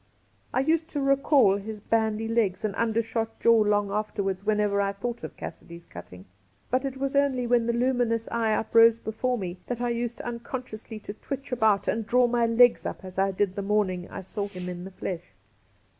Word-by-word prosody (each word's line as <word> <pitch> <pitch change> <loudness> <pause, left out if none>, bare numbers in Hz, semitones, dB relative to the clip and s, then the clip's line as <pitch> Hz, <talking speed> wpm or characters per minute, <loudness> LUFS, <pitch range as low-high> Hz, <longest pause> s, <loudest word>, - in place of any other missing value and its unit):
I 260 - +1
used 320 +3 +1
to 295 - -4
recall 275 -6 +4
his 210 +1 -7
bandy 220 0 0
legs 220 -4 0
and 210 - -1
undershot 225 0 -1
jaw 230 -1 +5
long 205 -1 +2
after 210 0 -2
wards 195 0 -2
whenever 210 -1 +1
I 200 0 0
thought 235 +4 -5
of - - -7
Cassidy's 170 0 -9
Cutting; 90 +1 -11 0.5
but 255 +2 +1
it 270 -1 -4
was 275 +1 -2
only 275 -3 +2
when 240 -1 +2
the 235 - +1
luminous 240 -2 +1
eye 225 -2 +1
uprose 230 +1 +5
before 240 +3 -2
me 180 -3 -5
that 245 -2 -3
I 245 0 0
used 235 0 -3
unconsciously 235 -2 -6
to 205 - -7
twitch 275 +5 -7
about 220 -5 +2
and 225 +1 0
draw 250 +1 +4
my 240 -1 +2
legs 240 +1 +5
up - - -6
as 185 0 -6
I 195 0 +3
did 195 0 0
the 200 - -2
morning 195 -3 0
I - - -6
saw 200 +2 -4
him 180 -3 -7
in 180 0 -6
the - - -7
flesh. 175 - -6
225 Hz, 200 wpm, -27 LUFS, 200-245 Hz, 0.5 s, jaw